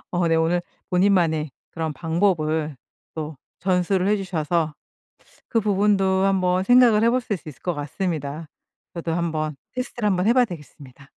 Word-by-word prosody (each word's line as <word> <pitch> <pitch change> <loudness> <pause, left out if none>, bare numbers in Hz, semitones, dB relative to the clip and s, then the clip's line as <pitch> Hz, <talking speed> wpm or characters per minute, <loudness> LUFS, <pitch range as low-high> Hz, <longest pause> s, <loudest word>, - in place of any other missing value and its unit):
어 175 -1 +2
네 165 - +3
오늘 165 +2 +2 0.3
본인만의 175 -5 +2 0.2
그런 160 -1 -3
방법을 160 -2 0 0.4
또 155 -1 -5 0.2
전수를 185 +1 +1
해 210 - +4
주셔서 170 -5 -1 0.7
그 230 - +1
부분도 195 -2 +2
한번 185 -2 +2
생각을 240 -1 +5
해 230 - +5
보실 240 -4 0
수 165 - -13
있을 145 - -11
것 175 - -1
같습니다. 150 0 -4 0.5
저도 170 -1 -3
한번 155 -3 -2 0.2
테스트를 250 -3 -2
한번 185 -1 +1
해 - - +6
봐야 250 0 +5
되겠습니다. 145 - -11
175 Hz, 315 characters per minute, -23 LUFS, 155-195 Hz, 0.7 s, 해